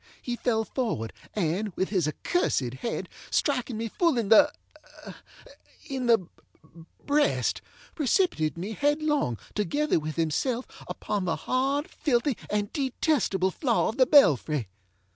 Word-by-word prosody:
He 245 - -4
fell 225 -2 0
forward, 215 - -3 0.2
and, 190 +1 -1
with 190 - -1
his 185 -6 +1
accursed 145 - 0
head, 235 - -3 0.2
striking 250 -5 0
me 230 +1 -2
full 330 - +1
in 220 -4 -1
theŌĆöin 295 -1 -2
the 225 -7 +3 0.8
breast, 295 +1 +1 0.3
precipitated 265 - +1
me 190 +6 -4
headlong, 290 - 0 0.2
together 290 - +1
with 155 -1 -5
himself, 230 - 0 0.2
upon 205 -3 -3
the 175 - 0
hard, 275 +4 0
filthy, 270 -6 0
and 205 0 -1
detestable 260 - 0
floor 240 - +1
of 225 - -5
the 255 -2 +5
belfry. 150 - +4
235 Hz, 125 wpm, -27 LUFS, 190-285 Hz, 0.8 s, the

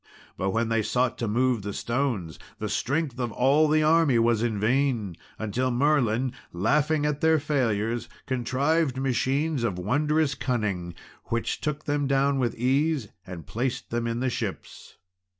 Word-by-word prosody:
But 95 - -1
when 115 +3 0
they 115 -1 +2
sought 125 +3 0
to 115 - -1
move 120 +1 +1
the 100 +1 -5
stones, 115 - -2 0.2
the - - -4
strength 140 -1 -1
of 120 -2 -1
all 140 +7 +3
the 155 +1 +3
army 155 -4 +4
was 115 -1 +3
in 115 -3 -1
vain, 115 -4 +1 0.2
until 115 +4 -1
Merlin, 130 -2 +1 0.2
laughing 145 - +1
at 150 -1 -1
their 160 -1 +4
failures, 120 -6 -1 0.2
contrived 135 +3 0
machines 135 +2 0
of 100 -6 -1
wondrous 145 - +1
cunning, 105 -10 -2 0.3
which 115 0 -2
took 150 0 -3
them 145 -1 0
down 140 0 +2
with 120 -3 0
ease, 135 0 +1 0.2
and 85 -4 -8
placed 120 - -3
them 115 0 -1
in 115 +1 -2
the 130 -1 0
ships. - - -6
130 Hz, 155 wpm, -26 LUFS, 115-145 Hz, 0.3 s, army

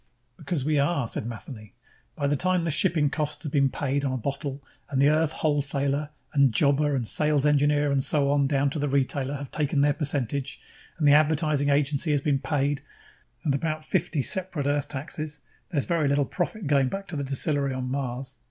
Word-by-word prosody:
"Because 155 -7 -3
we 150 -1 +2
are," 140 -3 +1
said 110 - -4
Matheny. 110 -2 -9 0.4
"By 145 - -2
the 145 +1 +2
time 185 +3 +1
the 165 - 0
shipping 155 -3 +2
costs 150 -1 -3
have 150 - -4
been 140 -2 +3
paid 140 0 -1
on 135 - 0
a 130 - -1
bottle, 140 +2 -4 0.3
and 135 - -1
the 140 +1 +5
Earth 155 0 +2
wholesaler 145 -1 0 0.2
and 140 -3 +4
jobber 145 +3 +2
and 120 -4 -2
sales 150 +1 +2
engineer 145 0 +3
and 135 -1 +1
so 140 -1 +1
on, 140 -1 +3
down 140 0 +1
to 155 - -3
the 145 0 0
retailer, 140 0 0
have 140 -1 -7
taken 145 -2 0
their 145 0 +4
percentage, 140 -2 -2 0.4
and 155 -4 +2
the 145 - +7
advertising 150 -1 +3
agency 145 +2 +1
has 145 - +1
been 140 -1 +1
paid, 145 -1 0 0.6
and 145 - +1
about 155 +2 -2
fifty 155 -2 0
separate 180 -5 -2
Earth 145 0 0
taxes 150 +2 -5 0.3
there's 150 -7 0
very 165 -4 +1
little 140 0 +2
profit 185 - -3
going 140 -2 +3
back 195 +5 -5
to 170 - -5
the 140 - -2
distillery 140 +1 0
on 130 -1 -3
Mars. 130 -1 -4
145 Hz, 200 wpm, -26 LUFS, 140-150 Hz, 0.6 s, the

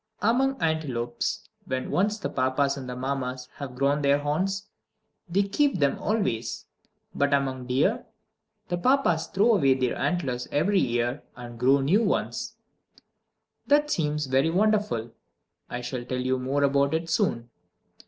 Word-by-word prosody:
3. 210 - +2
Among 270 +2 +1
antelopes, 135 -7 -2 0.2
when 130 0 -3
once 210 +3 +1
the 210 - -3
Papas 135 +2 +1
and 130 -2 -7
the 125 - -4
Mammas 130 -1 -3
have 135 -3 -7
grown 140 +3 +1
their 140 0 +4
horns, 185 +8 -1 0.6
they 195 +4 +2
keep 275 +6 +1
them 140 -4 +1
always. 115 - -1 0.5
But 140 0 +2
among 130 -2 -2
deer, 150 - +1 0.6
the 175 0 -1
Papas 255 -9 +2
throw 210 +5 +3
away 140 -10 +4
their 130 -2 0
antlers 130 -9 -1
every 190 +7 +2
year, 120 +2 0
and 120 -1 -9
grow 135 +3 +4
new 175 +11 +3
ones. - - -1 1.1
That 295 +1 +3
seems 150 -2 0
very 135 +4 +2
wonderful! 200 - +1 0.6
I 125 - -4
shall 125 0 -4
tell 125 +1 -3
you 130 0 0
more 135 +3 0
about 140 +1 +2
it 165 +1 -2
soon. 120 -7 0
140 Hz, 150 wpm, -26 LUFS, 130-185 Hz, 1.1 s, their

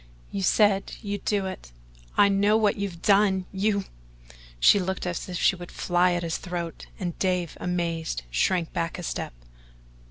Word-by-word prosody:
"You 200 - -3
said 200 +1 +3
you'd 205 -1 -4
do 205 -2 +1
it 185 - -7 0.5
I 200 - +7
know 200 +2 +3
what 215 -2 +2
you've 195 -4 -5
done 195 -2 +4
you 200 0 0 0.4
" - - -25 0.3
she 200 - +6
looked 190 0 -2
as 180 +1 -3
if 180 - -3
she 190 - +3
would 175 -1 -9
fly 175 0 +2
at 175 0 -1
his 165 -1 -1
throat, 175 -2 -5
and 175 -3 -4
Dave, 180 -3 0
amazed, 170 - -2
shrank 165 - +1
back 165 -1 -2
a 180 - -6
step. 160 - -4
185 Hz, 170 wpm, -26 LUFS, 170-200 Hz, 0.5 s, I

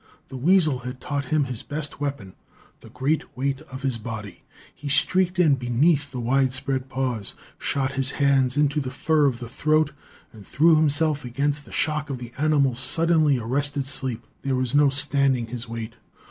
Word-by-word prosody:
The 135 - -9
weasel 155 -1 +3
had 125 +1 -7
taught 140 -1 -3
him 150 +3 +1
his 125 -4 -5
best 150 -1 -3
weapon, 140 -10 -4 0.5
the - - -15
great 140 +3 -2
weight 135 +1 -1
of 130 +1 -8
his 130 -4 -1
body. 105 -6 -7 0.3
He 145 +2 -7
streaked 185 +5 +2
in 165 -5 +4
beneath 140 +4 +1
the 130 - -6
wide 130 +2 +1
spread 130 0 -3
paws, 125 -5 -2 0.2
shot 135 -1 -1
his 135 0 +2
hands 135 -2 +2
into 145 0 +2
the 130 - -4
fur 150 +2 +2
of 125 -3 -1
the 120 -1 -7
throat 155 +4 +1 0.4
and 105 -4 -14
threw 160 +3 +4
himself 155 -1 +2
against 145 +4 -2
the - - -15
shock 150 -1 -1
of 135 - -3
the 120 -1 -9
animal's 140 -5 +2
suddenly 155 +1 +3
arrested 140 +4 -2
leap. 120 -3 -4 0.2
There 135 -1 -1
was 130 0 -1
no 145 0 +5
standing 140 -3 +2
his 115 0 -7
weight. 115 0 -6
135 Hz, 180 wpm, -24 LUFS, 125-150 Hz, 0.5 s, no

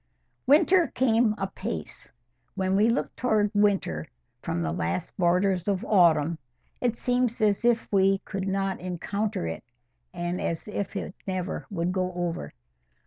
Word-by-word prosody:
Winter 335 +5 +5
came 230 -3 +2
apace. 185 - -5 0.5
When 190 0 0
we 210 +3 +4
look 235 - -1
towards 215 -4 +1
winter 200 - +1 0.3
from 85 - -2
the 80 - -1
last 85 +3 -3
borders 180 +1 +2
of 195 -2 0
autumn, 170 -5 +4 0.4
it 235 -2 0
seems 245 -1 0
as 210 0 +2
if 235 -1 +2
we 195 -1 +4
could 195 -1 -4
not 195 0 -1
encounter 185 - -3
it, 80 0 -5 0.5
and 175 0 -3
as 165 +4 -3
if 205 -1 -4
it 195 - -4
never 185 -1 -3
would 175 -2 -1
go 185 -1 -1
over. 170 - -3
195 Hz, 140 wpm, -27 LUFS, 175-215 Hz, 0.5 s, Winter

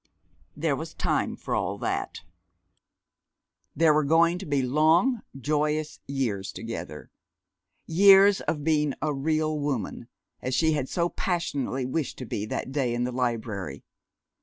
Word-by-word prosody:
There - - +1
was - - -7
time - - 0
for - - -5
all - - -1
that. - - -3 1.5
There 160 -2 +5
were 155 0 +3
going 165 +4 +3
to 195 - -7
be 140 -2 +1
long, 160 - +3 0.2
joyous 150 +2 -1
years 120 -9 -2
together, - - -7 0.7
years 195 +3 +6
of 150 -2 -2
being 150 -3 +1
a 155 -1 0
"real 155 +2 0
woman," 140 -8 -3 0.3
as 130 0 -2
she 160 +4 +3
had 145 -4 -1
so 170 -1 +1
passionately 140 -9 -2
wished 140 +3 -2
to 130 - -6
be 105 -1 -4
that 130 - -4
day 130 -4 0
in 120 - -1
the 125 - -1
library. 115 -5 -3
150 Hz, 140 wpm, -26 LUFS, 130-160 Hz, 1.5 s, years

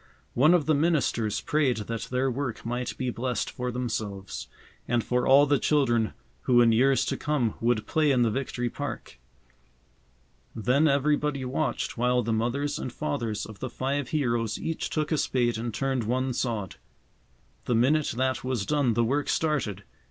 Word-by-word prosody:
One 150 +8 +5
of 160 -5 +1
the 155 - +3
ministers 140 -9 +1
prayed 145 -6 +1
that 110 +1 -4
their 130 +1 0
work 130 -3 -4
might 120 +1 -3
be 130 -1 -1
blessed 125 +1 -2
for 125 0 -3
themselves, 100 - -4 0.4
and 120 -1 +1
for 125 0 0
all 140 +2 +7
the 145 -1 +2
children 120 -7 +2 0.3
who 125 -1 +5
in 120 -1 +6
years 130 +4 +3
to - - -1
come 140 -7 0
would 115 -2 +1
play 155 -2 +2
in 125 -3 +3
the 115 - +2
Victory 125 -1 -2
Park. - - -6 1.4
Then 125 +7 +2
everybody 145 -1 +1
watched 130 -2 -2
while 125 0 +2
the 115 +1 -1
mothers 130 +6 -1
and 130 - -4
fathers 120 -7 -3
of 110 -3 -11
the 130 - -4
five 135 +3 -2
heroes 120 -7 0
each 165 - -3
took 155 0 -2
a 155 - +2
spade 120 -3 0
and 120 +1 -3
turned 130 0 -1
one 130 +3 0
sod. 110 -7 -3 0.9
The 120 - +1
minute 145 +6 +3
that 130 0 0
was 125 -6 -1
done 140 -5 +1
the 120 - +3
work 140 +5 0
started. 135 - 0
125 Hz, 170 wpm, -27 LUFS, 115-140 Hz, 1.4 s, all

